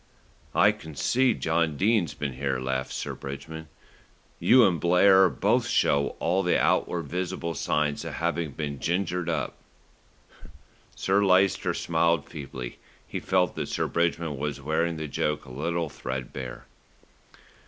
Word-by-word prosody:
"I - - +6
can 80 -2 -11
see 120 - +2
John 80 -2 0
Dene's 100 -4 +2
been 70 -3 -3
here," 65 0 -2
laughed 65 0 -2
Sir - - -4
Bridgman. 75 +4 -8 0.7
"You 125 -2 +6
and 90 -4 +2
Blair 95 +3 +5
both - - +1
show 70 0 +2
all 90 +4 +1
the 90 -2 +2
outward 85 -1 +1
visible 85 +1 -3
signs 75 -2 -1
of - - -6
having 85 -3 -2
been 70 -2 -4
'gingered 90 -1 -1
up.'" 80 -4 -2 1.4
Sir 100 +2 +2
Lyster 95 0 +3
smiled 85 -2 +1
feebly. 65 -5 -7 0.3
He - - -4
felt 90 -3 +1
that - - -3
Sir - - -1
Bridgman 85 -3 -1
was 75 0 -3
wearing 80 +3 -1
the 80 -1 -4
joke 75 +1 -2
a 65 - -11
little 85 +5 -2
threadbare. 65 -2 -6
80 Hz, 140 wpm, -27 LUFS, 70-90 Hz, 1.4 s, I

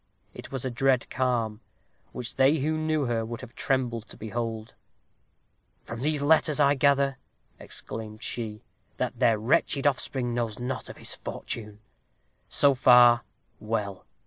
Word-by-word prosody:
It - - -10
was 135 -1 -4
a 130 - -2
dread 130 0 +1
calm, 120 -4 -1 0.5
which 125 -1 -6
they 135 +4 +5
who 155 +2 0
knew 155 -2 0
her 115 -2 0
would 115 +1 -6
have 130 -2 -11
trembled 120 -4 -1
to - - -12
behold. 110 0 -4 1.1
"From 120 0 -7
these 150 0 0
letters 155 0 +3
I 140 -1 +5
gather," 140 -1 +2 0.4
exclaimed 110 0 -8
she, 110 -3 -4 0.3
"that - - -3
their 115 -2 +4
wretched 140 +4 +1
offspring 130 -3 0
knows 115 -3 -2
not 125 +1 -4
of - - -9
his - - -3
fortune. 105 -2 -6 0.7
So 140 -1 +4
far, 125 -2 +6 0.4
well. 105 -3 -3
125 Hz, 145 wpm, -27 LUFS, 115-140 Hz, 1.1 s, far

